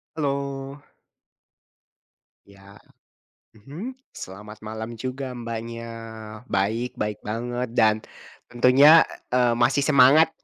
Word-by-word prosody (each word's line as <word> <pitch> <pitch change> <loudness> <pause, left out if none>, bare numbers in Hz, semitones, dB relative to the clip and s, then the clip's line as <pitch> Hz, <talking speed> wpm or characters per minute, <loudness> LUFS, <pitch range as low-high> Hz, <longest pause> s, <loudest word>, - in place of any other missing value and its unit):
Halo. 140 -1 -3 1.7
Iya, 100 0 -17 0.8
mhm, 175 - -8 0.2
selamat 105 +3 -10
malam 110 +2 -6
juga 130 +2 -5
Mbaknya. 115 0 -6 0.6
Baik, 110 +4 -1
baik 105 -1 -3
banget 120 +3 -3
dan, 110 -3 +4 0.5
tentunya, 135 +6 +6 0.3
eee, 125 -2 +3
masih 120 +4 +2
semangat 145 +3 +6
120 Hz, 85 wpm, -24 LUFS, 110-140 Hz, 1.7 s, tentunya